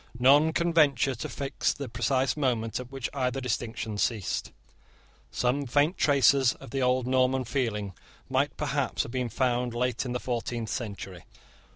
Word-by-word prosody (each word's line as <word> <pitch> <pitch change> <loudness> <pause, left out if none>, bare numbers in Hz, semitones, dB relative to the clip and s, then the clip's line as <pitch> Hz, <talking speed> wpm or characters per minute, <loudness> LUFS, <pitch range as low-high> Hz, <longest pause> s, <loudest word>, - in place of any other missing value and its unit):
None 145 +6 +5
can 170 +1 0
venture 140 -5 +4
to - - -6
fix 140 -1 -1
the 140 - -6
precise 130 +3 0
moment 120 -7 -1
at 125 0 -8
which 135 -4 -3
either 130 -1 -1
distinction 115 -3 -3
ceased. 105 -1 -1 0.8
Some 130 +3 0
faint 145 +8 +2
traces 135 -2 +4
of - - -12
the 135 - -1
old 125 0 +2
Norman 130 0 +2
feeling 115 -5 -2 0.3
might - - 0
perhaps - - -1
have - - -8
been 125 -1 -2
found 125 0 0
late 125 0 0
in 125 - -4
the 125 - -1
fourteenth 120 -2 -3
century. 100 -6 -6
125 Hz, 160 wpm, -28 LUFS, 115-135 Hz, 0.8 s, None